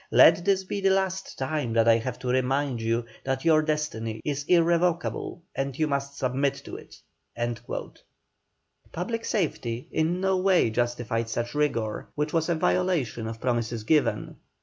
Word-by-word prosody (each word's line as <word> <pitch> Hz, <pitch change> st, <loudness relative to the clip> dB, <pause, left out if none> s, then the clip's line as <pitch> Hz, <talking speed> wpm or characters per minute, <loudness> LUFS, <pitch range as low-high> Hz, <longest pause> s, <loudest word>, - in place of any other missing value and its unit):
Let 165 Hz, +9 st, +6 dB
this 195 Hz, -1 st, +3 dB
be 200 Hz, +1 st, -4 dB
the 195 Hz, -, +4 dB
last 190 Hz, 0 st, -1 dB
time 135 Hz, -3 st, -2 dB
that 115 Hz, 0 st, +3 dB
I 115 Hz, 0 st, +6 dB
have 120 Hz, +1 st, -4 dB
to 130 Hz, -, -5 dB
remind 130 Hz, 0 st, +1 dB
you 115 Hz, +1 st, 0 dB, 0.2 s
that 135 Hz, +1 st, -2 dB
your 155 Hz, -2 st, +5 dB
destiny 150 Hz, -8 st, -2 dB
is 145 Hz, -1 st, -1 dB
irrevocable 170 Hz, 0 st, +1 dB
and 135 Hz, -1 st, -2 dB
you 155 Hz, -, +2 dB
must 140 Hz, -1 st, -2 dB
submit 135 Hz, +2 st, 0 dB
to -, -, -7 dB
it." -, -, -12 dB, 1.9 s
Public 230 Hz, +7 st, -3 dB
safety 130 Hz, -, -2 dB
in 165 Hz, +3 st, +1 dB
no 190 Hz, 0 st, +2 dB
way 185 Hz, -10 st, +3 dB
justified 120 Hz, -1 st, -1 dB
such 120 Hz, +1 st, -2 dB
rigour, 115 Hz, -8 st, -1 dB
which 150 Hz, +1 st, -2 dB
was 165 Hz, 0 st, +1 dB
a 170 Hz, -, +2 dB
violation 160 Hz, -, 0 dB
of 115 Hz, 0 st, -6 dB
promises 120 Hz, -2 st, -1 dB
given. 150 Hz, +6 st, +1 dB
140 Hz, 155 wpm, -26 LUFS, 120-170 Hz, 1.9 s, Let